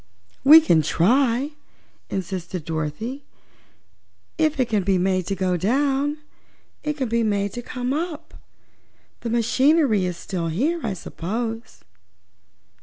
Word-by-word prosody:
"We 305 +4 +10
can 170 - +3
try," 245 - +2 0.6
insisted 180 -3 -4
Dorothy. 165 - -4 1.2
"If 310 -2 +1
it 255 - +2
can 215 -3 +1
be 190 0 +1
made 185 -1 0
to 195 - -1
go 185 -1 0
down, 275 - +1 0.7
it 300 0 -2
can 260 -3 -1
be 235 +1 +1
made 205 -2 0
to 240 - -5
come 250 +1 -3
up. 325 0 -4 0.9
The 235 - -4
machinery 240 - +3
is 180 -1 -3
still 175 -3 -4
here, 275 - 0
I 220 -4 -1
suppose. 225 +6 -5
225 Hz, 125 wpm, -23 LUFS, 185-275 Hz, 1.2 s, We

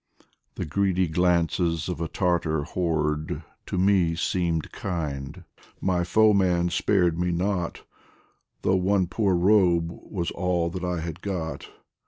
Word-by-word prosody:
The - - -3
greedy 95 +3 +1
glances 85 -1 +1
of 90 -2 -4
a 80 - -1
Tartar 80 -4 0
horde 75 -2 -1 0.2
To - - -3
me 90 -3 +3
seemed 85 -1 -1
kind 80 -2 -4 0.4
my 90 -2 +1
foeman 95 -3 +3
spared 90 -2 +2
me 90 0 +1
not 90 0 -2 0.8
Though 95 - +3
one 95 +1 +2
poor 95 +1 +1
robe 90 -3 +3
was 85 0 -5
all 85 -2 0
that 90 0 -5
I 90 -2 -1
had 85 +1 -6
got. 90 -5 -4
90 Hz, 130 wpm, -25 LUFS, 85-95 Hz, 0.8 s, me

